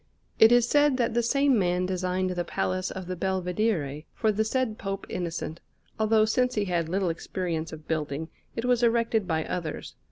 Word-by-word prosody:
It 220 Hz, +1 st, +8 dB
is 240 Hz, -1 st, +5 dB
said 290 Hz, 0 st, +4 dB
that 235 Hz, -3 st, +1 dB
the 240 Hz, -, +2 dB
same 275 Hz, +1 st, +3 dB
man 180 Hz, -1 st, +1 dB
designed 185 Hz, 0 st, -1 dB
the 175 Hz, -1 st, -1 dB
Palace 95 Hz, -, -2 dB
of 190 Hz, -1 st, -6 dB
the 185 Hz, +1 st, -4 dB
Belvedere 180 Hz, -5 st, -1 dB
for 220 Hz, -2 st, +2 dB
the 215 Hz, +1 st, +1 dB
said 225 Hz, -1 st, -1 dB
Pope 195 Hz, 0 st, -4 dB
Innocent, 170 Hz, -2 st, -4 dB, 0.4 s
although, 220 Hz, 0 st, +4 dB
since 250 Hz, +3 st, +1 dB
he 210 Hz, -2 st, +1 dB
had 170 Hz, -3 st, -1 dB
little 190 Hz, 0 st, 0 dB
experience 165 Hz, -1 st, -3 dB
of 155 Hz, -1 st, -10 dB
building, 155 Hz, 0 st, -2 dB, 0.3 s
it 230 Hz, -, -2 dB
was 250 Hz, -1 st, +3 dB
erected 230 Hz, -3 st, +2 dB
by 160 Hz, -2 st, 0 dB
others. 165 Hz, -4 st, -4 dB
190 Hz, 185 wpm, -27 LUFS, 170-230 Hz, 0.4 s, It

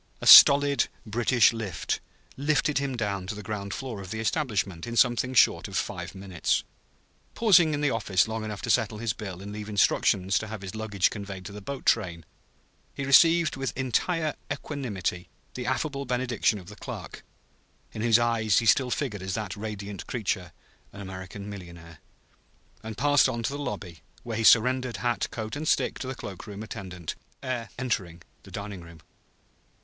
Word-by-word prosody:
A -, -, -7 dB
stolid 140 Hz, -2 st, +9 dB, 0.2 s
British 120 Hz, +2 st, +3 dB
lift 105 Hz, -7 st, -3 dB, 0.4 s
lifted 150 Hz, 0 st, +1 dB
him 135 Hz, -3 st, -3 dB
down 100 Hz, -4 st, -2 dB
to 105 Hz, -, -4 dB
the 105 Hz, -, -8 dB
ground 100 Hz, -1 st, -5 dB
floor 120 Hz, -5 st, -5 dB
of 95 Hz, -, -9 dB
the 110 Hz, +3 st, -4 dB
establishment 105 Hz, -, -1 dB
in 115 Hz, -, -5 dB
something 125 Hz, +2 st, +3 dB
short -, -, +4 dB
of -, -, -4 dB
five -, -, -4 dB
minutes. 95 Hz, -3 st, -1 dB, 0.7 s
Pausing 175 Hz, -9 st, +5 dB
in 145 Hz, -, -3 dB
the 145 Hz, -2 st, +2 dB
office 100 Hz, -6 st, +1 dB
long 110 Hz, 0 st, -4 dB
enough 105 Hz, -1 st, -6 dB
to 120 Hz, -, 0 dB
settle 110 Hz, 0 st, +1 dB
his 115 Hz, -1 st, -1 dB
bill 95 Hz, -3 st, -7 dB
and 100 Hz, -, -7 dB
leave 105 Hz, 0 st, -7 dB
instructions 95 Hz, -2 st, +2 dB
to 110 Hz, -, -6 dB
have 110 Hz, -2 st, -7 dB
his 95 Hz, -, -6 dB
luggage 110 Hz, -4 st, 0 dB
conveyed 100 Hz, -3 st, -7 dB
to -, -, -7 dB
the 105 Hz, +1 st, -9 dB
boat 135 Hz, +6 st, -6 dB
train, 85 Hz, -8 st, +1 dB, 0.7 s
he 140 Hz, -, -3 dB
received 165 Hz, +4 st, +5 dB
with 135 Hz, -3 st, -4 dB
entire 155 Hz, +5 st, 0 dB, 0.2 s
equanimity 100 Hz, -, -4 dB, 0.2 s
the 125 Hz, -1 st, -5 dB
affable 140 Hz, +2 st, -1 dB
benediction 125 Hz, -3 st, 0 dB
of 95 Hz, -, -10 dB
the 105 Hz, +4 st, -11 dB
clerk, -, -, -8 dB, 0.7 s
in 110 Hz, -, -6 dB
whose 115 Hz, -1 st, +5 dB
eyes 115 Hz, -4 st, +2 dB
he 115 Hz, -, +2 dB
still 125 Hz, +2 st, +4 dB
figured 120 Hz, -7 st, -2 dB
as 95 Hz, 0 st, -3 dB
that 110 Hz, -1 st, -4 dB
radiant 105 Hz, -2 st, -6 dB
creature, 95 Hz, -6 st, -2 dB, 0.4 s
an 100 Hz, -, -10 dB
American 95 Hz, +1 st, -8 dB
millionaire; 85 Hz, -5 st, -10 dB, 0.8 s
and 110 Hz, -1 st, -7 dB
passed 145 Hz, -1 st, +4 dB
on 115 Hz, 0 st, -3 dB
to 115 Hz, -, -1 dB
the 145 Hz, -, -5 dB
lobby, 90 Hz, -, -6 dB, 0.2 s
where 115 Hz, -2 st, -4 dB
he -, -, 0 dB
surrendered 125 Hz, +2 st, +4 dB
hat, 120 Hz, -1 st, -1 dB
coat 110 Hz, +1 st, -5 dB
and 155 Hz, +2 st, -4 dB
stick -, -, +1 dB
to 130 Hz, -, -5 dB
the 130 Hz, -, -4 dB
cloak 95 Hz, -4 st, -8 dB
room 105 Hz, 0 st, -7 dB
attendant, 90 Hz, -6 st, -6 dB, 0.3 s
ere 125 Hz, -3 st, -3 dB
entering 90 Hz, -9 st, -3 dB, 0.2 s
the -, -, -15 dB
dining 100 Hz, -2 st, -6 dB
room. 85 Hz, -1 st, -13 dB
110 Hz, 180 wpm, -27 LUFS, 100-130 Hz, 0.8 s, stolid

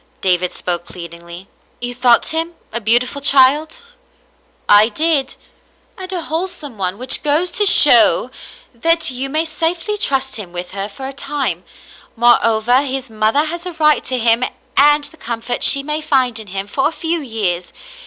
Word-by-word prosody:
David 180 Hz, -1 st, 0 dB
spoke 175 Hz, -1 st, -5 dB
plead 170 Hz, -2 st, -10 dB
ingly, 170 Hz, +2 st, -12 dB, 0.2 s
*' -, -, -39 dB
You 245 Hz, 0 st, -5 dB
thought 245 Hz, -1 st, +2 dB
him 330 Hz, +1 st, -4 dB, 0.2 s
a 235 Hz, -, -3 dB
beautiful 245 Hz, +5 st, 0 dB
child? 285 Hz, -, +3 dB, 0.3 s
" -, -, -39 dB
*' -, -, -39 dB
I 210 Hz, +2 st, +5 dB
did, 285 Hz, +2 st, -1 dB, 0.6 s
and 375 Hz, -2 st, -8 dB
a 355 Hz, -3 st, -4 dB
wholesome 320 Hz, -5 st, -5 dB
one, 185 Hz, 0 st, -2 dB
which 255 Hz, +2 st, +3 dB
goes 310 Hz, +5 st, +1 dB
to 415 Hz, -, +2 dB
show -, -, +6 dB, 0.4 s
that 330 Hz, +6 st, 0 dB
you 260 Hz, +2 st, -5 dB
may 310 Hz, +3 st, 0 dB
safely 335 Hz, +6 st, -3 dB
trust 265 Hz, -5 st, 0 dB
him 195 Hz, -5 st, -8 dB
with 180 Hz, 0 st, -6 dB
her 200 Hz, +1 st, -4 dB
for 265 Hz, +6 st, -9 dB
a 275 Hz, -, -7 dB
time. 280 Hz, +1 st, -3 dB, 0.5 s
Moreover, 240 Hz, +1 st, +2 dB
his 270 Hz, -3 st, -5 dB
mother 220 Hz, +7 st, 0 dB
has 345 Hz, +3 st, -6 dB
a 360 Hz, -, -7 dB
right 305 Hz, -2 st, +2 dB
to 255 Hz, -, -2 dB
him 230 Hz, +1 st, +2 dB, 0.3 s
and 295 Hz, +2 st, +4 dB
the 320 Hz, -, -7 dB
comfort 235 Hz, 0 st, -5 dB
she 275 Hz, 0 st, +4 dB
may 300 Hz, +2 st, -2 dB
find 255 Hz, -6 st, 0 dB
in 220 Hz, -, -11 dB
him 195 Hz, +1 st, -5 dB
for 270 Hz, +8 st, -1 dB
a -, -, -4 dB
few 330 Hz, +1 st, -3 dB
years. 200 Hz, -9 st, -3 dB
260 Hz, 180 wpm, -16 LUFS, 220-310 Hz, 0.6 s, show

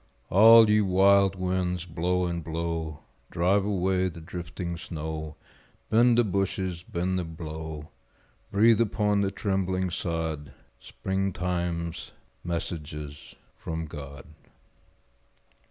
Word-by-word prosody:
All 110 Hz, +3 st, +8 dB
ye 105 Hz, 0 st, +4 dB
wild 95 Hz, 0 st, +4 dB
winds, 90 Hz, -1 st, -1 dB
blow 90 Hz, +2 st, 0 dB
and 85 Hz, -1 st, -3 dB
blow, 80 Hz, -2 st, -3 dB, 0.3 s
Drive 95 Hz, +4 st, +2 dB
away 95 Hz, -2 st, +1 dB
the 85 Hz, -, -10 dB
drifting 85 Hz, +1 st, -6 dB
snow, 80 Hz, -2 st, -6 dB, 0.6 s
Bend 120 Hz, +1 st, +5 dB
the 120 Hz, -, +5 dB
bushes, 95 Hz, -3 st, -1 dB
bend 90 Hz, +1 st, -2 dB
them 80 Hz, -2 st, -6 dB
low; 80 Hz, -1 st, -6 dB, 0.6 s
Breathe 110 Hz, +3 st, +5 dB
upon 105 Hz, -2 st, +1 dB
the 100 Hz, -, +1 dB
trembling 95 Hz, -2 st, -1 dB
sod 80 Hz, -4 st, -3 dB, 0.3 s
Springtime's 90 Hz, -3 st, -3 dB, 0.3 s
messages 75 Hz, -4 st, -5 dB, 0.2 s
from 80 Hz, 0 st, -5 dB
God. 70 Hz, -3 st, -9 dB
90 Hz, 105 wpm, -27 LUFS, 80-95 Hz, 0.6 s, All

